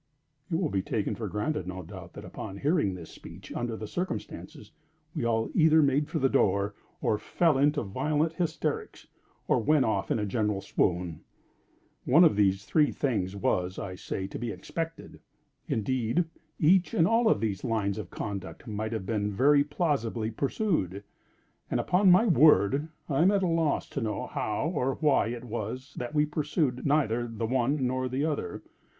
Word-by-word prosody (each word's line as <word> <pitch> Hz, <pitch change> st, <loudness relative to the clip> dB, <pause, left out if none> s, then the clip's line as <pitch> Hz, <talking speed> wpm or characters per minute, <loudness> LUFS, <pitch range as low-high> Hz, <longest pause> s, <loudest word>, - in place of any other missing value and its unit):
It 165 Hz, -, -1 dB
will 165 Hz, -2 st, 0 dB
be 95 Hz, -, +1 dB
taken -, -, -2 dB
for -, -, -4 dB
granted, 105 Hz, -, -2 dB
no 95 Hz, 0 st, -5 dB
doubt, -, -, -10 dB
that -, -, -9 dB
upon 95 Hz, -, -7 dB
hearing 140 Hz, -, +1 dB
this 85 Hz, -3 st, -10 dB
speech -, -, -11 dB
under 120 Hz, -2 st, -3 dB
the 110 Hz, -, -6 dB
circumstances, 175 Hz, -, -5 dB, 0.4 s
we -, -, -2 dB
all 115 Hz, -1 st, 0 dB
either 160 Hz, -1 st, +5 dB
made 140 Hz, +1 st, +2 dB
for -, -, -2 dB
the 135 Hz, -, +3 dB
door, 100 Hz, -3 st, +2 dB, 0.3 s
or 105 Hz, -, +1 dB
fell 165 Hz, -4 st, +2 dB
into 145 Hz, +1 st, +2 dB
violent 150 Hz, +10 st, 0 dB
hysterics, 170 Hz, -1 st, -3 dB, 0.4 s
or -, -, +3 dB
went 140 Hz, +3 st, +3 dB
off 100 Hz, -3 st, -1 dB
in -, -, +1 dB
a 105 Hz, -, -1 dB
general 105 Hz, 0 st, 0 dB
swoon. 90 Hz, -4 st, -1 dB, 0.8 s
One 155 Hz, +8 st, +6 dB
of 160 Hz, -, +5 dB
these 100 Hz, -1 st, +2 dB
three 150 Hz, -2 st, +3 dB
things 100 Hz, -9 st, -1 dB
was, 90 Hz, -1 st, -1 dB
I 95 Hz, -, -5 dB
say, 95 Hz, +1 st, -4 dB
to 95 Hz, -, -7 dB
be 120 Hz, -, -3 dB
expected. 165 Hz, +8 st, -6 dB, 0.5 s
Indeed 120 Hz, -, 0 dB, 0.3 s
each 180 Hz, +4 st, +4 dB
and 165 Hz, -, +4 dB
all 225 Hz, +1 st, +3 dB
of -, -, +3 dB
these 105 Hz, -3 st, -2 dB
lines 110 Hz, -4 st, -1 dB
of -, -, -7 dB
conduct 100 Hz, -3 st, -6 dB
might 110 Hz, 0 st, -3 dB
have 110 Hz, -4 st, -3 dB
been 105 Hz, 0 st, -1 dB
very 140 Hz, +8 st, +4 dB
plausibly 135 Hz, -8 st, -1 dB
pursued. 115 Hz, -, -1 dB, 0.7 s
And, -, -, 0 dB
upon 185 Hz, +2 st, +3 dB
my 185 Hz, +6 st, +6 dB
word, 150 Hz, -, +5 dB, 0.2 s
I 140 Hz, 0 st, +1 dB
am 180 Hz, -, +6 dB
at 200 Hz, -1 st, +2 dB
a -, -, +2 dB
loss 165 Hz, -3 st, +1 dB
to -, -, -4 dB
know 110 Hz, -2 st, -2 dB
how 105 Hz, +8 st, -2 dB
or 135 Hz, -4 st, 0 dB
why 150 Hz, -6 st, +2 dB
it 120 Hz, +1 st, -5 dB
was 120 Hz, +4 st, -5 dB
that 125 Hz, +5 st, -5 dB
we 150 Hz, 0 st, +4 dB
pursued 150 Hz, -3 st, -1 dB
neither 120 Hz, -5 st, +1 dB
the 115 Hz, 0 st, -4 dB
one 130 Hz, +3 st, +1 dB
nor 130 Hz, 0 st, -1 dB
the 135 Hz, +4 st, -1 dB
other. 155 Hz, -2 st, -3 dB
125 Hz, 180 wpm, -28 LUFS, 105-155 Hz, 0.8 s, One